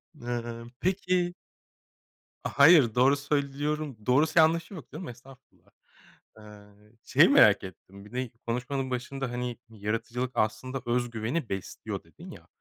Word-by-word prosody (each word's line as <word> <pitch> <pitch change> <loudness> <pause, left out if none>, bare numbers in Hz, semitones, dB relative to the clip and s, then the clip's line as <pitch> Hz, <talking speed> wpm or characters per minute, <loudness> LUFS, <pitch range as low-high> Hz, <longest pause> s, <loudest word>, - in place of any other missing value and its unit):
Imm, 120 -2 -5
peki 180 -1 0 1.1
A, - - -2
hayır, 140 -7 +7
doğru 130 +3 +5
söylüyorum 145 0 -2
doğrusu 155 +6 +3
yanlışı 165 +4 +3
yok 160 - -10
canım. 165 +3 -7
Estağfurullah. 130 +2 -16 0.7
Iıı, 105 0 -16
şeyi - - +5
merak - - +6
ettim. 95 +2 -12
Bir 105 - -15
de 125 -1 -3 0.2
konuşmanın 130 +3 -2
başında, 130 +1 -4
hani, 125 -1 -4
"Yaratıcılık 115 +4 -3
aslında 130 +5 -1
öz 120 0 0
güveni 115 +5 -3
besliyor." 95 -1 -5
dedin - - -13
ya. - - -13
125 Hz, 130 wpm, -28 LUFS, 115-145 Hz, 1.1 s, hayır